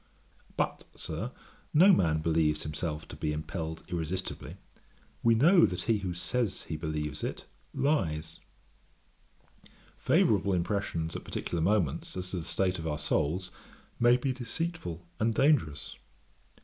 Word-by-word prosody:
But, -, -, -1 dB
Sir, -, -, -4 dB, 0.4 s
no 190 Hz, +6 st, +8 dB
man 80 Hz, -, +3 dB
believes 80 Hz, -1 st, +2 dB
himself 75 Hz, +1 st, -4 dB
to -, -, -7 dB
be 75 Hz, -, -2 dB
impelled 80 Hz, +1 st, -4 dB
irresistibly; 90 Hz, +1 st, -4 dB, 0.6 s
we 115 Hz, -1 st, +5 dB
know 170 Hz, +9 st, +6 dB
that 90 Hz, 0 st, -4 dB
he 115 Hz, -3 st, +2 dB
who 90 Hz, -3 st, -3 dB
says 115 Hz, +3 st, -1 dB
he 80 Hz, -, -5 dB
believes 75 Hz, -1 st, -3 dB
it, -, -, -4 dB, 0.3 s
lies. 80 Hz, -, 0 dB, 1.6 s
Favourable 100 Hz, -, +3 dB
impressions 85 Hz, -3 st, -1 dB
at -, -, -5 dB
particular 85 Hz, -, -3 dB
moments, 85 Hz, -4 st, +1 dB
as 90 Hz, 0 st, -3 dB
to 95 Hz, -, -2 dB
the 80 Hz, -, -4 dB
state 95 Hz, -2 st, 0 dB
of 80 Hz, -, -4 dB
our 75 Hz, -2 st, -1 dB
souls, 85 Hz, +6 st, 0 dB, 0.5 s
may 120 Hz, +1 st, +6 dB
be 130 Hz, +1 st, -1 dB
deceitful 125 Hz, -, -4 dB
and 110 Hz, 0 st, +1 dB
dangerous. 105 Hz, -, +2 dB
90 Hz, 135 wpm, -30 LUFS, 80-110 Hz, 1.6 s, no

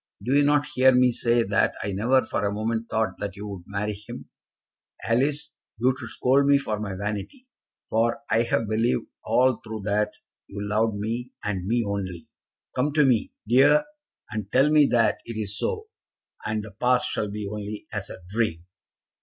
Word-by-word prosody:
Do 125 Hz, -, 0 dB
you 145 Hz, +1 st, +5 dB
not 145 Hz, 0 st, +3 dB
hear 130 Hz, +1 st, +6 dB
me 125 Hz, 0 st, +5 dB
say 120 Hz, 0 st, +2 dB
that 100 Hz, -1 st, +1 dB
I 100 Hz, -, -2 dB
never 120 Hz, +7 st, +3 dB
for -, -, -2 dB
a 100 Hz, -, +1 dB
moment 110 Hz, +2 st, -2 dB
thought 110 Hz, 0 st, -1 dB
that 100 Hz, -2 st, -4 dB
you 100 Hz, -, -7 dB
would 95 Hz, -3 st, -8 dB
marry 105 Hz, +1 st, -2 dB
him? 105 Hz, +1 st, -10 dB, 0.8 s
Alice, 140 Hz, +6 st, 0 dB, 0.3 s
you 125 Hz, +4 st, +3 dB
should 120 Hz, -4 st, -8 dB
scold 140 Hz, +2 st, +2 dB
me 140 Hz, 0 st, +6 dB
for 110 Hz, -7 st, -3 dB
my 105 Hz, -3 st, -4 dB
vanity, 105 Hz, -, -5 dB, 0.4 s
for 115 Hz, +1 st, +1 dB
I 110 Hz, +1 st, +3 dB
have 115 Hz, -1 st, 0 dB
believed 110 Hz, +3 st, +1 dB, 0.2 s
all 130 Hz, -1 st, +2 dB
through 110 Hz, -1 st, -6 dB
that 105 Hz, +1 st, 0 dB, 0.3 s
you 100 Hz, +1 st, -5 dB
loved 110 Hz, +1 st, +1 dB
me, 115 Hz, +5 st, -4 dB
and 95 Hz, -3 st, -2 dB
me 120 Hz, +2 st, +2 dB
only. 95 Hz, -4 st, -4 dB, 0.5 s
Come 140 Hz, +3 st, +1 dB
to 150 Hz, -1 st, +4 dB
me, 120 Hz, -5 st, +2 dB, 0.2 s
dear, 135 Hz, -, +5 dB, 0.5 s
and 105 Hz, -2 st, -4 dB
tell 135 Hz, +4 st, +4 dB
me 150 Hz, -2 st, +6 dB
that 115 Hz, -2 st, +2 dB
it 115 Hz, -2 st, -7 dB
is 100 Hz, -1 st, -3 dB
so, 435 Hz, -, -3 dB, 0.5 s
and 110 Hz, 0 st, -2 dB
the 110 Hz, -, -9 dB
past 125 Hz, +5 st, +2 dB
shall 105 Hz, -, -2 dB
be 105 Hz, 0 st, -4 dB
only 105 Hz, 0 st, -6 dB
as 105 Hz, -2 st, -4 dB
a 95 Hz, -, -10 dB
dream." 100 Hz, -5 st, -1 dB
110 Hz, 185 wpm, -25 LUFS, 105-125 Hz, 0.8 s, hear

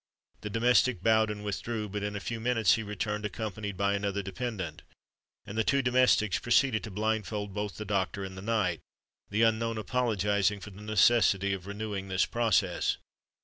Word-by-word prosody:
The 105 Hz, -, -5 dB
domestic 120 Hz, -2 st, +3 dB
bowed 110 Hz, -1 st, +4 dB
and 105 Hz, -1 st, -5 dB
withdrew: 105 Hz, +2 st, -3 dB
but 105 Hz, +1 st, -4 dB
in 105 Hz, 0 st, -3 dB
a -, -, -2 dB
few 115 Hz, +3 st, -4 dB
minutes 115 Hz, -4 st, +3 dB
he 115 Hz, -, 0 dB
returned, 105 Hz, 0 st, -3 dB
accompanied 105 Hz, -1 st, -4 dB
by 100 Hz, +1 st, +1 dB
another 100 Hz, 0 st, -1 dB
dependant; 95 Hz, -6 st, -5 dB, 0.6 s
and 100 Hz, -, -8 dB
the -, -, +3 dB
two 140 Hz, +4 st, +2 dB
domestics 125 Hz, -6 st, +3 dB
proceeded 120 Hz, -1 st, +2 dB
to -, -, -7 dB
blindfold 105 Hz, -1 st, -2 dB
both 105 Hz, 0 st, -4 dB
the 110 Hz, -, -5 dB
doctor 100 Hz, 0 st, -1 dB
and 95 Hz, -1 st, -7 dB
the 95 Hz, -, -8 dB
knight, 100 Hz, -6 st, 0 dB, 0.5 s
the 105 Hz, +3 st, +2 dB
unknown 115 Hz, 0 st, +1 dB
apologising 105 Hz, -2 st, +1 dB
for 105 Hz, -, -9 dB
the 100 Hz, +2 st, -12 dB
necessity 105 Hz, -2 st, +3 dB
of 95 Hz, -1 st, -6 dB
renewing 100 Hz, -1 st, -4 dB
this 95 Hz, 0 st, +2 dB
process. 110 Hz, -6 st, +1 dB
105 Hz, 175 wpm, -29 LUFS, 100-115 Hz, 0.6 s, bowed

